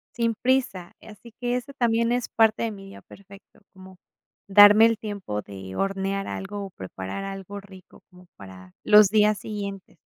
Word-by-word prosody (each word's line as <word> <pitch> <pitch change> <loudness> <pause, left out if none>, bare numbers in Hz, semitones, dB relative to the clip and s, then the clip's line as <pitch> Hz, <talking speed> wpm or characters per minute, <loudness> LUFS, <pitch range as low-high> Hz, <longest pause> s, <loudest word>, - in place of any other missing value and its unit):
Sin 230 -1 0
prisa, 245 -9 -1
así 220 +2 -14
que 245 0 -1
eso 250 +3 -5
también 230 -2 +1
eso 245 0 -1
parte 220 -1 +3
de 230 - -2
mi 195 -2 -11
día 195 - -13
perfecto, 195 +1 -18
como 190 0 -15 0.5
darme 205 +2 +8
el 230 -1 -1
tiempo 200 - -5
de 95 -2 -10
hornear 195 - -2
algo, 200 +1 -6
o - - -9
preparar 95 - -7
algo 195 0 -7
rico 190 -2 -17
como 180 0 -18
para 95 -2 -13
los 210 -1 +6
días 210 0 +3
siguientes. 200 -4 -7
200 Hz, 165 wpm, -24 LUFS, 190-220 Hz, 0.5 s, darme